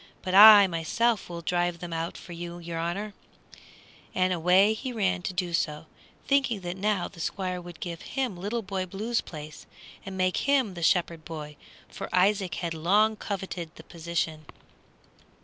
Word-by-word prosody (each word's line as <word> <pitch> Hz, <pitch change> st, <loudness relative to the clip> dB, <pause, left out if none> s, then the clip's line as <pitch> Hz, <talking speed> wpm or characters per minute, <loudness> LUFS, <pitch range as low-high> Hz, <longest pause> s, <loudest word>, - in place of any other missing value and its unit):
But 185 Hz, -, -3 dB
I 205 Hz, 0 st, +10 dB
myself 195 Hz, +7 st, 0 dB
will 170 Hz, -1 st, -7 dB
drive 175 Hz, +1 st, 0 dB
them 175 Hz, -1 st, -7 dB
out 165 Hz, +1 st, -3 dB
for 180 Hz, -, -12 dB
your 170 Hz, -1 st, -6 dB
honor," 195 Hz, +5 st, -3 dB, 1.0 s
and 185 Hz, 0 st, +2 dB
away 180 Hz, +5 st, +4 dB
he 255 Hz, +4 st, -5 dB
ran 195 Hz, -5 st, 0 dB
to 185 Hz, -, -3 dB
do 180 Hz, -1 st, -2 dB
so, 150 Hz, -1 st, -1 dB, 0.4 s
thinking 265 Hz, -7 st, +2 dB
that 175 Hz, 0 st, -4 dB
now 195 Hz, -1 st, 0 dB
the 180 Hz, -, -15 dB
Squire 185 Hz, +1 st, -3 dB
would 175 Hz, -1 st, -11 dB
give 170 Hz, -2 st, -6 dB
him 260 Hz, -7 st, -3 dB
Little 210 Hz, +6 st, -3 dB
Boy 190 Hz, -1 st, -3 dB
Blue's 220 Hz, +6 st, -2 dB
place, 155 Hz, -1 st, -10 dB, 0.4 s
and 190 Hz, 0 st, -7 dB
make 185 Hz, 0 st, +1 dB
him 265 Hz, -7 st, +2 dB
the 175 Hz, -, -8 dB
shepherd 170 Hz, -1 st, +1 dB
boy, 150 Hz, -2 st, -7 dB, 0.3 s
for -, -, -7 dB
Isaac 190 Hz, -2 st, +2 dB
had 170 Hz, -2 st, -3 dB
long 205 Hz, +7 st, +3 dB
coveted 190 Hz, -5 st, -5 dB
the -, -, -12 dB
position. 165 Hz, -2 st, -4 dB
180 Hz, 165 wpm, -27 LUFS, 170-205 Hz, 1.0 s, I